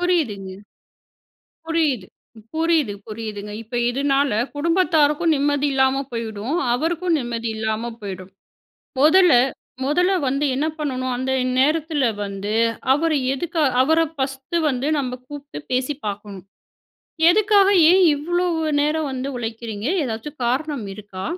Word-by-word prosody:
புரியுதுங்க. 210 - -1 1.1
புரியுது, 305 - 0 0.5
புரியுது, 320 -7 +1
புரியுதுங்க. 210 -2 -6
இப்ப 230 +2 -12 0.2
இதனால 275 +2 +1 0.3
குடும்பத்தாருக்கும் 325 -1 +2
நிம்மதி 285 0 +1
இல்லாம 265 +1 +2
போயிடும். 230 +2 -4 0.2
அவருக்கும் 330 +5 0
நிம்மதி 235 -1 -3
இல்லாம 220 +2 -2
போயிடும். 190 -1 -7 0.7
முதல்ல 350 +4 +6 0.5
முதல்ல 355 +7 +2 0.2
வந்து 275 +3 0
என்ன 280 +4 0
பண்ணணும்? 260 -3 -2
அந்த 260 +1 -2 0.3
நேரத்தில 305 +1 +2 0.2
வந்து 200 +1 -4 0.4
அவர் 310 +3 +1 0.2
எதுக்கா 325 +4 -2 0.2
அவரை 320 +4 +3
ஃபஸ்ட்டு 270 +3 -3
வந்து 255 +1 -2
நம்ம 260 -3 -2
கூப்பிட்டு 285 - -9
பேசி 255 +3 0
பார்க்கணும். 205 -2 -6 0.9
"எதுக்காக, 410 0 +4 0.2
ஏன் 375 - +5
இவ்ளோ 350 +5 -1 0.3
நேரம் 300 0 0
வந்து 260 +1 -3
உழைக்கிறீங்க? 225 -2 -5 0.2
ஏதாச்சு 225 +3 -4
காரணம் 265 0 -1
இருக்கா? 195 -2 -8
275 Hz, 110 wpm, -21 LUFS, 230-315 Hz, 1.1 s, முதல்ல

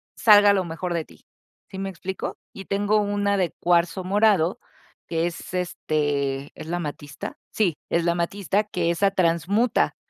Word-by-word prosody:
salga 205 -2 +7
lo 190 -2 +1
mejor 170 +2 -4
de 165 -1 -1
ti, - - -20 0.5
¿sí 190 - -7
me 195 0 -3
explico? 190 +1 -5 0.2
Y 195 - -9
tengo 205 +2 +1
una 205 -1 0
de 180 -3 0
cuarzo 175 +2 +2
morado 195 -3 +2 0.5
que 165 0 0
es, 170 -1 -5
este, 145 -5 -1
es 155 - -9
la 175 +2 -2
amatista. 145 -3 -6
Sí, 195 -6 +1 0.2
es 170 - +1
la 170 - +3
amatista, 195 +4 0
que 175 -5 -1
esa 195 +4 +2
transmuta, 185 - +1
180 Hz, 160 wpm, -24 LUFS, 165-200 Hz, 0.5 s, salga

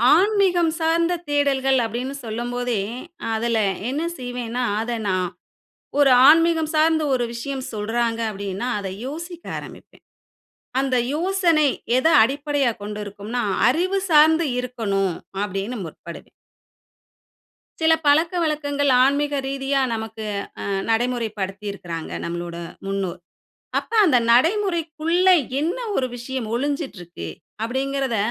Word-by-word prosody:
ஆன்மீகம் 370 -4 +3
சார்ந்த 335 +2 +2 0.2
தேடல்கள் 270 -2 +2
அப்படினு 250 +5 -4
சொல்லம்போதே 240 0 -2 0.5
அதில 230 0 0 0.3
என்ன 290 +4 -2 0.2
செய்வேனா 245 -1 -3 0.2
அத 235 0 -2
நான் 185 -2 0 0.7
ஒரு 275 -2 +6 0.2
ஆன்மீகம் 325 -1 +4
சார்ந்த 315 0 +3
ஒரு 245 -1 +1
விஷயம் 265 +2 -4
சொல்றாங்க 225 +2 -1
அப்படினா 200 +3 -4
அத 195 -1 -4 0.2
யோசிக்க 335 +4 -7
ஆரம்பிப்பே. - - -12 0.8
அந்த 265 -2 +1 0.2
யோசனை 340 -3 +2 0.3
எத 260 - +2 0.2
அடிப்படையாக 280 -1 0
கொண்டிருக்கும்னா 210 +3 -4 0.3
அறிவு 370 +6 +1
சார்ந்து 315 +2 +6 0.2
இருக்கனும் 200 -7 -1 0.3
அப்படினு 205 +4 -3
முற்படுவே. 165 +1 -10 1.5
சில 320 0 +5
பழக்கவழக்கங்கள் 300 -3 +2
ஆன்மீக 285 +1 +1
ரீதியா 275 0 0
நமக்கு 220 -1 -5 0.4
ஆநடைமுறைப்படுத்தி 210 -1 -1
இருக்கிறாங்க 170 -4 -6
நம்மளுட 170 0 -4 0.3
முன்னோர். 195 -3 -3 0.6
அப்ப - - -7
அந்த 275 -6 +4 0.2
நடைமுறைக்குள்ள 335 - +2 0.3
என்ன 340 +10 -1 0.2
ஒரு 255 - +1
விஷயம் 245 -1 -4
ஒளிஞ்சிட்டிருக்கு 240 - -4 0.3
அப்படிங்கிறத 265 0 -1
260 Hz, 100 wpm, -22 LUFS, 220-310 Hz, 1.5 s, ஒரு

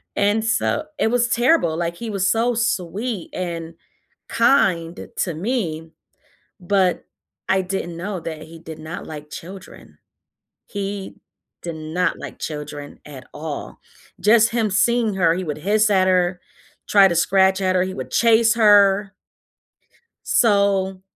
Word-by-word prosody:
And 205 +2 +1
so 235 +6 0 0.2
it - - +2
was 245 0 +2
terrible, 240 - +2
like, 170 0 -2
he 225 +3 -6
was 195 -1 0
so 235 +2 +1
sweet 215 -2 -2
and 170 -2 -5 0.6
kind 185 -9 +1
to 175 - -1
me, 165 -4 -3 0.7
but 185 0 +1 0.4
I 190 - +3
didn't 180 -2 -4
know 185 +2 -4
that 160 -1 -7
he 165 0 -13
did 160 -1 -9
not 160 +2 -7
like 150 -1 -9
children. 185 +4 -11 0.7
He 200 -1 -5 0.4
did 170 -1 -6
not 160 +4 -2
like - - -9
children 150 -1 -7
at 135 -3 -11
all. 150 -1 -6 0.4
Just 225 +2 +4
him 220 -2 +1
seeing 230 +3 +2
her, 170 -3 +3
he 185 +1 -3
would 150 -1 -4
hiss 210 +5 +2
at 190 -2 +3
her, 180 -1 +1 0.5
try 200 -2 +6
to 170 - -1
scratch 190 +2 +3
at 185 -1 +1
her, 180 - +3
he 185 0 -3
would 185 - -7
chase 230 0 +4
her 205 -2 +4 1.1
so, 200 -3 +2
190 Hz, 140 wpm, -21 LUFS, 170-210 Hz, 1.1 s, try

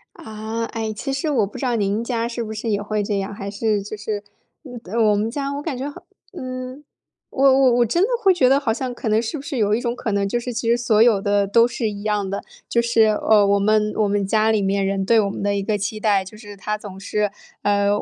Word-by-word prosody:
啊， 220 +1 -5
哎， 225 -1 -4
其 270 +6 -4
实 270 +4 -1
我 235 -9 +2
不 205 - -10
知 275 - -3
道 245 -2 +1
您 210 +1 0
家 235 -1 -1
是 235 0 -4
不 220 -1 -6
是 220 +2 -4
也 205 -1 0
会 210 0 -2
这 200 -1 -1
样。 195 +1 -4
还 200 -1 -6
是 210 0 0
就 210 +2 -7
是 210 0 -4 0.6
呃， 200 +6 -7
我 210 -2 +4
们 210 +2 0
家 280 0 -3
我 285 - -4
感 295 -4 -4
觉 275 +3 -3
好 - - -12 0.3
呃， 255 -4 -6 0.5
我 270 - -1 0.2
我 260 -2 +5
我 240 - +4
真 340 - +1
的 445 - +1
会 390 -3 +5
觉 265 -8 +3
得 275 +1 +4
好 225 -6 0
像 255 0 -4
可 240 - -6
能 215 +1 +3
是 235 +7 -4
不 - - -7
是 285 -1 -5
有 210 -2 +2
一 225 - +2
种 240 0 -2
可 245 -3 -3
能， 200 0 +1
就 240 - -1
是 245 +1 -5
其 230 0 -2
实 235 - +5
所 225 -3 +2
有 225 -4 +5
的 205 0 +1
都 230 +4 +5
是 240 -2 -2
一 205 -1 -7
样 210 -2 -1
的。 200 - -4 0.2
就 235 - +2
是， 235 -1 +3
呃， 210 -1 +3
我 200 0 +3
们 210 +1 +2
我 215 - +2
们 200 -1 0
家 220 +2 +3
里 215 - +2
面 195 0 0
人 195 0 -1
对 230 +3 +4
我 200 -2 +1
们 - - -6
的 200 0 0
一 200 - -1
个 210 +1 0
期 205 +2 -3
待。 205 -3 +2
就 210 +3 -11
是 205 -2 -11
他 210 +2 -3
总 200 -3 -10
是， 205 +1 -1 0.3
呃， 200 0 +2
215 Hz, 290 characters per minute, -21 LUFS, 205-240 Hz, 0.6 s, 我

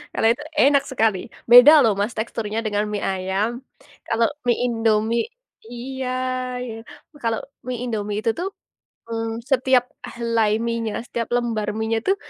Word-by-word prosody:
Kalau 225 - +2
itu 270 - -11 0.2
enak 280 0 +4
sekali, 220 -6 +2 0.3
beda 245 +5 +11
loh 220 -3 +4
Mas 210 +3 -1
teksturnya 220 -1 -3
dengan 210 0 0
mie 205 - -3
ayam, 195 +5 -1 0.5
kalau 230 0 +3 0.2
mie 240 - +3
Indomie 225 -1 +1 0.4
iya 255 +2 -6 1.2
kalau 225 -1 0 0.3
mie 250 -1 -2
Indomie 210 -4 -3
itu 225 - +2
tuh, 360 - -1 0.6
hmm, 225 0 -3
setiap 255 -1 +4 0.3
helai 230 -2 +1 0.2
mienya 230 -2 -2
setiap 230 -1 -3
lembar 230 -3 -1
mienya 220 0 0
tuh 390 - +4
230 Hz, 135 wpm, -22 LUFS, 215-240 Hz, 1.2 s, beda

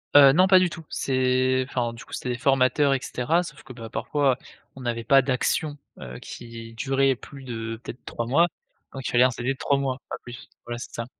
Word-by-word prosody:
Heu, 140 -2 +10
non 185 +3 +5
pas 185 -1 +7
du 180 -1 +2
tout, 165 -1 -9
c'est 130 0 +1
enfin 120 -3 -1
du 115 - -11
coup, - - -15
c'était 125 - -4
des 120 - -1
formateurs 135 +1 +3
et 135 - +1
cetera. 155 +8 0
Sauf 175 - -9
que, 130 - -11
bah, 115 -2 -9
parfois 140 -1 +1 0.4
on 135 - -10
n'avait 115 -1 -2
pas 135 +3 +5
d'actions, 145 +3 0 0.2
heu, 65 -1 -8
qui 115 -1 -9
duraient 135 +1 +2
plus 135 +2 -12
de 115 -2 -5
peut-être 120 - -9
3 115 0 -4
mois, 165 +7 +4 0.5
donc 135 -2 -5
il - - -2
fallait 125 +1 +5
un 130 - +4
CV 120 +2 -3
de - - -14
3 140 - +1
mois, 135 -2 -1
pas - - -4
plus. 120 0 -10 0.2
Voilà, 120 0 -4
c'est - - -9
ça. 115 - -4
130 Hz, 230 wpm, -25 LUFS, 120-140 Hz, 0.5 s, Heu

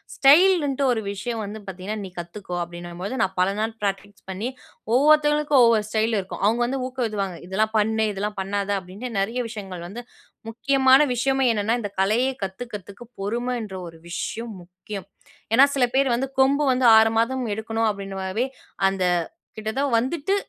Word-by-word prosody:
ஸ்டைல்ன்ட்டு 290 -2 +5
ஒரு 225 -2 0
விஷயம் 225 +3 -4
வந்து 210 +2 -6
பாத்தீங்கன்னா, 190 +3 -5
நீ - - -8
கத்துக்கோ 180 +1 -7
அப்படீன்னும்போது, 175 +5 -7
நா - - +4
பல 185 +1 +3
நாள் 220 +1 -1
ப்ராக்டிஸ் 200 0 -4
பண்ணி, 205 +7 -3 0.4
ஒவ்வொருத்தவங்களுக்கும் 295 -1 +4
ஒவ்வொரு 225 -2 +4
ஸ்டைலு 220 0 +1
இருக்கும். 190 - -8
அவுங்க 230 +3 +2
வந்து 265 +2 -2
ஊக்குவிப்பாங்க. 210 -8 -3
"இதெல்லாம் 215 +4 0
பண்ணு, 220 +1 +2
இதெல்லாம் 205 +1 -4
பண்ணாத"அப்படீன்ட்டு, 200 +3 -3
நெறைய 230 +6 -1
விஷயங்கள் 190 -6 -7
வந்து 235 +6 -8 0.5
முக்கியமான 265 +3 +4
விஷயமே 265 +2 +1
என்னன்னா, 215 +2 +1
இந்த 205 -2 -5
கலையை 230 +7 +2
கத்துக்கிறதுக்கு, 200 +1 -7 0.2
பொறுமைன்ற 230 -1 -3
ஒரு 165 - -15
விஷயம் 225 +5 -4
முக்கியம். 185 +2 -9 0.5
ஏன்னா 265 +4 +8
சில 255 - +4
பேர் 270 -2 +3
வந்து, 265 +2 -2
"கொம்பு 280 +2 +3
வந்து 255 0 +1
6 220 0 +5
மாதம் 255 +2 0
எடுக்கணும்." 225 0 -1
அப்படீன்ற 195 -1 -7
மாதிரி, 215 +7 -1 0.4
அந்த 195 -1 -2 0.5
கிட்ட 215 0 -3
தான் 280 -3 0
வந்துட்டு, 295 +9 -1
220 Hz, 150 wpm, -23 LUFS, 195-255 Hz, 0.5 s, ஏன்னா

